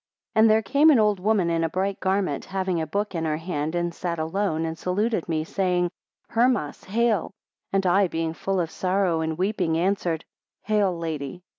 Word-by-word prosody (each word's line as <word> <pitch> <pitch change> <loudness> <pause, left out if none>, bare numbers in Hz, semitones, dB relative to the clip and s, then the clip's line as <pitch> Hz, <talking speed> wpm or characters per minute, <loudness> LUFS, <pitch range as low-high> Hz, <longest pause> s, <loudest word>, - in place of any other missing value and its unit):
17 220 - +1
And 220 - +6
there 220 +1 +4
came 285 +9 +4
an 295 - +6
old 210 -3 +3
woman 195 -3 +2
in 165 0 +1
a 165 - +1
bright 190 +3 -2
garment, 190 -6 0
having 185 -3 -1
a 160 - -3
book 205 +5 -2
in 165 -2 -2
her 155 -1 0
hand, 160 -1 -3
and 175 0 -1
sat 170 -1 -3
alone, 165 0 -1
and 160 0 -3
saluted 185 +2 -1
me, 155 -1 0
saying, 180 0 0 0.4
Hermas, 230 - +1
hail! 215 -2 0 0.4
and 195 -1 +1
I 190 +2 +4
being 165 -1 -2
full 195 +3 -2
of 165 -2 -1
sorrow 185 -3 0
and 160 0 -2
weeping, 180 -4 0
answered, 175 -2 0 0.4
Hail 205 -4 +1
Lady! 160 0 -5
180 Hz, 190 wpm, -25 LUFS, 165-200 Hz, 0.4 s, And